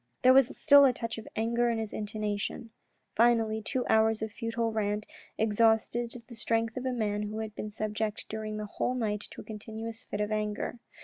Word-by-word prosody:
There 255 +1 +8
was 265 -1 +4
still 285 -2 +7
a 260 - +4
touch 230 -1 -4
of 220 - -11
anger 235 +2 +1
in 230 - 0
his 220 -2 -4
intonation. 210 +1 -3 0.4
Finally 225 -1 +3
two 250 +4 -2
hours 220 0 +3
of 220 - -3
futile 230 +1 -2
rant 210 -1 -1 0.3
exhausted 225 +2 +2
the 240 - -12
strength 225 0 0
of 255 0 -3
a - - +1
man 210 -4 -1
who 210 +1 -4
had 220 -1 -4
been 215 - -5
subject 215 0 -3
during 215 -1 -4
the 215 - -3
whole 250 +4 -2
night 210 -4 -1
to - - -9
a - - -11
continuous 220 +2 -7
fit 205 - -5
of 210 0 -1
anger. 215 +2 -2
220 Hz, 195 wpm, -30 LUFS, 215-230 Hz, 0.4 s, There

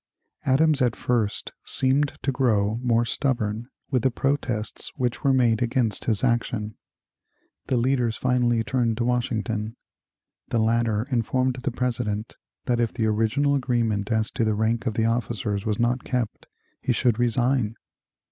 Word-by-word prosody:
Adams 145 +2 +4
at 120 -2 +2
first 115 -4 -1
seemed 140 +2 +1
to 135 - +1
grow 110 -5 +1
more 120 -2 +2
stubborn 115 -4 -1 0.2
with 130 -3 +2
the 130 - +3
protests 130 -4 0
which 125 +1 -2
were 140 - +4
made 120 -4 +3
against 120 -3 +1
his 110 -1 +1
action. 115 -3 0 0.9
The 130 - +1
leaders 120 -2 +1
finally 120 -2 +1
turned 120 -3 0
to 120 - 0
Washington. 115 -2 -1 0.7
The - - -1
latter 110 -1 +1
informed 130 +2 +1
the 135 +3 -2
President 115 -4 -2 0.3
that 120 -2 +1
if 115 -2 +1
the 115 -3 -1
original 115 +7 +2
agreement 115 -6 0
as 110 0 +1
to - - -1
the 110 -1 +1
rank 110 +3 0
of 110 - -1
the 110 - +1
officers 110 -3 -1
was 105 -1 0
not 120 +2 +1
kept, 125 -4 -3 0.3
he 125 - +1
should 120 -1 +1
resign. 120 -1 +1
120 Hz, 150 wpm, -25 LUFS, 110-125 Hz, 0.9 s, Adams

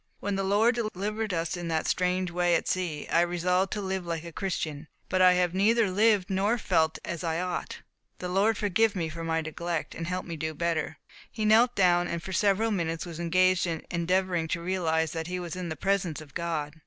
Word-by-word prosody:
When 205 -1 -2
the 195 - -1
Lord 210 +5 +3
delivered 215 -1 -2
us 165 0 -1
in 175 -1 -5
that 160 -1 0
strange 180 0 0
way 175 0 +2
at - - -1
sea, 175 -5 -2
I 170 - +4
resolved 180 +2 +1
to 210 - -3
live 190 -1 -2
like 165 -2 -4
a 170 - -8
Christian, 160 -4 -3 0.2
but 185 - +1
I 185 0 +7
have 180 -1 +1
neither 210 +2 +3
lived 205 -1 +3
nor 200 +4 +1
felt 160 -7 +1
as 170 0 -4
I 165 -1 -1
ought. 180 0 -4 0.4
The 180 - -5
Lord 200 +4 +2
forgive 210 +2 +2
me 165 -3 -2
for 165 +1 -6
my 165 0 0
neglect, 165 +1 -4
and 165 - -5
help 185 +1 -3
me 170 -2 -6
to 160 - -2
do 160 - -5
better." 165 -1 -1 0.3
He 215 -1 -3
knelt 230 +3 +5
down, 175 -2 +3
and 170 -1 -4
for 190 - -6
several 205 +4 +2
minutes 165 -4 -2
was 170 -2 -8
engaged 185 +2 +3
in 165 -2 -4
endeavouring 175 0 0
to 170 +1 -2
realize 160 -3 0
that 165 -1 -4
he 180 0 -3
was 175 -2 -5
in 180 -2 -4
the 160 - -3
presence 190 -3 0
of 150 -3 -13
God. 160 -2 -3
180 Hz, 220 wpm, -28 LUFS, 165-195 Hz, 0.4 s, I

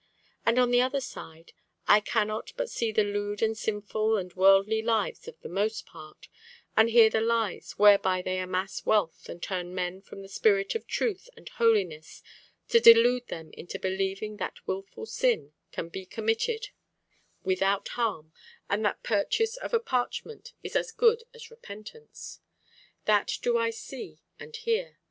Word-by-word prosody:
And 230 +1 +4
on 250 -1 +4
the 245 0 +5
other 260 +2 +1
side, 165 -10 -10 0.3
I 210 - +7
cannot 215 0 -2
but - - -3
see 230 -2 -1
the 215 0 +3
lewd 205 +1 -2
and 220 0 +1
sinful 215 +1 -1
and 180 -2 -5
worldly 195 +3 +4
lives 230 - -1
of 475 0 -10
the - - -7
most 205 +3 -2
part, 155 -2 -14 0.5
and 220 +1 +5
hear 230 -1 +7
the 220 0 0
lies 225 -3 -1
whereby 195 -3 +5
they 185 0 -2
amass 185 +1 -3
wealth 205 -6 0
and 170 - -8
turn 180 -1 -4
men 180 +1 -3
from 195 0 -11
the - - -10
spirit 195 0 +2
of 455 - -5
truth 440 +1 -2
and - - -11
holiness 190 -9 0 0.5
to 465 - +6
delude 245 - +7
them 160 -1 -8
into 175 - -7
believing 195 +3 -2
that - - -6
wilful 195 - -5
sin 485 +1 0 0.2
can 165 - -5
be 185 +2 -8
committed 230 - -1 0.7
without 195 +1 +1
harm, 190 -10 -2 0.3
and 205 +2 0
that 205 - -1
purchase 445 - +1
of - - -6
a 465 - +3
parchment 450 - -3
is - - -7
as 460 - 0
good 460 0 +3
as 470 -1 -13
repentance. 455 - -11 0.7
That - - +2
do 485 -1 +2
I 465 -1 +2
see 450 -1 -9 0.2
and 460 - -10
hear. 460 +2 -2
215 Hz, 165 wpm, -28 LUFS, 195-270 Hz, 0.7 s, I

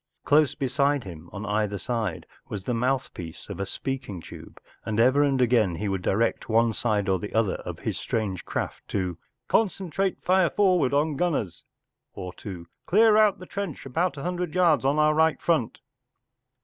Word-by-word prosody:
Close 150 -1 +4
beside 140 0 +1
him 85 -3 -10
on 100 +1 -6
either 105 -1 0
side 115 +3 -3 0.2
was 100 -3 -5
the 125 - -2
mouthpiece 120 -9 -3
of - - -6
a 100 - -2
speaking 130 -6 -4
tube, - - -12 0.2
and 110 0 -2
ever 130 +5 +5
and 140 -2 +2
again 115 -8 +3
he 105 +5 -3
would 95 -2 -1
direct 110 +7 0
one 115 0 +3
side 105 -4 0
or 95 -1 +2 0.2
other 110 -4 +2
of - - -7
his - - -3
strange 105 -5 -2
craft - - -4
to 90 -3 -2 0.3
“Concentrate 195 -3 0
fire 185 -2 +4
forward 185 -9 +3
on 145 +1 +1
gunners,” 140 - -1 0.5
or 90 -1 -6
to 90 -3 -8
“ - - -57
Clear 215 +3 +5
out 205 -4 +3
trench 195 -10 -5
about 165 +6 -1
a 140 - -6
hundred 180 -2 -3
yards 170 -6 +4
on 140 +2 +2
our 155 0 +4
right 160 0 +3
front. 160 -10 0
130 Hz, 175 wpm, -26 LUFS, 105-160 Hz, 0.5 s, ever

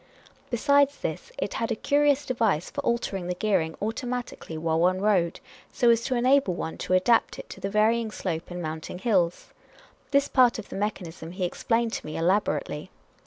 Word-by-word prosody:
Besides 280 +3 +3
this, 480 - -5
it - - -3
had 230 0 -2
a - - +1
curious 285 +3 +2
device 220 -10 0
for - - -3
altering 195 -6 -1
the 180 - -2
gear 205 0 +2
ing 160 0 -5
automatically 235 -5 -4
while 160 0 0
one 185 +2 +3
rode, 190 -5 +1 0.3
so 240 -1 +4
as 230 0 +2
to 260 - 0
enable 250 -5 +3
one 160 - -5
to - - -2
adapt 205 +5 +3
it - - -8
to - - -9
the 195 - -2
varying 220 +2 +2
slope 170 -5 -4
in 175 0 -5
mounting 160 +2 -5
hills. 185 -4 0 0.6
This 280 0 +3
part 250 -2 +4
of 220 - -8
the - - -7
mechanism 175 -5 -4
he 185 -1 -1
explained 230 +5 0
to - - -4
me 155 - -5
elaborately. 185 +5 0
210 Hz, 185 wpm, -26 LUFS, 175-240 Hz, 0.6 s, so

